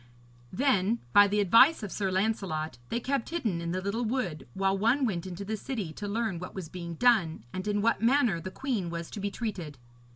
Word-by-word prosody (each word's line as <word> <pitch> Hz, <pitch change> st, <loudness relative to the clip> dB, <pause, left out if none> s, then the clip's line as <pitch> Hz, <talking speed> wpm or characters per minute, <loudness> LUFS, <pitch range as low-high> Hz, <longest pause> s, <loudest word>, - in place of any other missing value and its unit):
Then, 230 Hz, -2 st, +2 dB, 0.2 s
by 205 Hz, 0 st, +8 dB
the 205 Hz, +1 st, 0 dB
advice 230 Hz, -, +6 dB
of 205 Hz, -, -5 dB
Sir 195 Hz, -2 st, -1 dB
Lancelot, 185 Hz, -, -1 dB
they 235 Hz, -, -1 dB
kept 270 Hz, 0 st, -2 dB
hidden 225 Hz, -, -1 dB
in 170 Hz, 0 st, -3 dB
the 185 Hz, +1 st, -2 dB
little 210 Hz, +5 st, -1 dB
wood, 215 Hz, -, -2 dB
while 195 Hz, 0 st, +1 dB
one 230 Hz, +7 st, +2 dB
went 190 Hz, -6 st, -2 dB
into 185 Hz, +2 st, -6 dB
the 220 Hz, +2 st, -2 dB
city 210 Hz, -, -4 dB
to 205 Hz, -, -6 dB
learn 215 Hz, -4 st, -1 dB
what 180 Hz, -, -8 dB
was 185 Hz, -5 st, -6 dB
being 170 Hz, -1 st, -6 dB
done, 190 Hz, -, +3 dB
and 185 Hz, +2 st, -4 dB
in 205 Hz, 0 st, 0 dB
what 230 Hz, -1 st, +2 dB
manner 235 Hz, -6 st, +3 dB
the 185 Hz, -, -5 dB
queen 220 Hz, -5 st, -2 dB
was 170 Hz, 0 st, -5 dB
to -, -, -6 dB
be 200 Hz, +1 st, -1 dB
treated. 195 Hz, -, -5 dB
200 Hz, 215 wpm, -29 LUFS, 180-230 Hz, 0.2 s, by